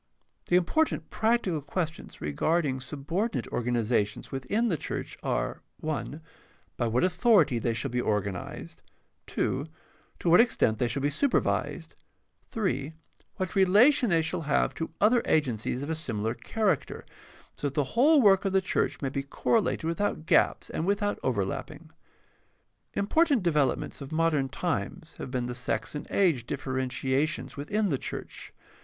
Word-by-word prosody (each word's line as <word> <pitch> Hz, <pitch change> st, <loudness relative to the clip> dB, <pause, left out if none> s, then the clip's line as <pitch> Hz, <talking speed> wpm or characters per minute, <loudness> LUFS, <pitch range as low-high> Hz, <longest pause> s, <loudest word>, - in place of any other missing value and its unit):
— -, -, -47 dB
The 175 Hz, -, +3 dB
important 240 Hz, -, +1 dB
practical 220 Hz, -8 st, +1 dB
questions 165 Hz, +2 st, -4 dB
regarding 135 Hz, -, 0 dB
subordinate 150 Hz, -, -3 dB
organizations 115 Hz, -3 st, -1 dB
within 200 Hz, -, 0 dB
the 175 Hz, -, +1 dB
church -, -, -5 dB
are -, -, -2 dB, 0.3 s
(i) 150 Hz, -1 st, -3 dB, 0.6 s
by 120 Hz, -, 0 dB
what 115 Hz, +2 st, +1 dB
authority 180 Hz, -, +4 dB
they 115 Hz, 0 st, -1 dB
shall 135 Hz, +2 st, -3 dB
be 125 Hz, 0 st, 0 dB
organized, 100 Hz, -5 st, -3 dB, 0.5 s
(2) 140 Hz, +4 st, -1 dB, 0.5 s
to -, -, -5 dB
what 170 Hz, +1 st, +7 dB
extent 115 Hz, -, +3 dB
they 120 Hz, -, +2 dB
shall 135 Hz, +4 st, -3 dB
be 145 Hz, -, +2 dB
supervised, 280 Hz, -, 0 dB, 0.6 s
(3) 175 Hz, -9 st, -2 dB, 0.4 s
what 185 Hz, -1 st, -3 dB
relation 210 Hz, +7 st, +5 dB
they 165 Hz, -2 st, +3 dB
shall 160 Hz, +1 st, -2 dB
have 150 Hz, -2 st, +1 dB
to 165 Hz, -, -4 dB
other 230 Hz, +4 st, +4 dB
agencies 125 Hz, -3 st, 0 dB
of 145 Hz, -, -5 dB
a -, -, +1 dB
similar 115 Hz, -8 st, -2 dB
character, 190 Hz, -, -1 dB, 0.5 s
so 145 Hz, -, -2 dB
that 140 Hz, -, -6 dB
the 145 Hz, -4 st, 0 dB
whole 285 Hz, +4 st, +5 dB
work 195 Hz, -2 st, +5 dB
of 195 Hz, -1 st, -1 dB
the 190 Hz, -, +5 dB
church 185 Hz, -4 st, -1 dB
may 135 Hz, -, 0 dB
be 140 Hz, +1 st, -2 dB
correlated 180 Hz, +9 st, 0 dB
without 165 Hz, 0 st, -1 dB
gaps -, -, +2 dB
and 165 Hz, -, -2 dB
without 205 Hz, +1 st, 0 dB
overlapping. -, -, -3 dB, 1.0 s
Important 280 Hz, -, +2 dB
developments 150 Hz, -5 st, 0 dB
of 140 Hz, -, -8 dB
modern 155 Hz, -4 st, +1 dB
times 170 Hz, +2 st, -3 dB
have -, -, -6 dB
been 125 Hz, -1 st, -2 dB
the 125 Hz, -, -4 dB
sex 125 Hz, +1 st, -2 dB
and 150 Hz, -, -6 dB
age 160 Hz, -12 st, +2 dB
differentiations 130 Hz, +3 st, -1 dB
within 200 Hz, +9 st, -1 dB
the 135 Hz, -5 st, 0 dB
church. -, -, -6 dB
155 Hz, 150 wpm, -28 LUFS, 130-195 Hz, 1.0 s, what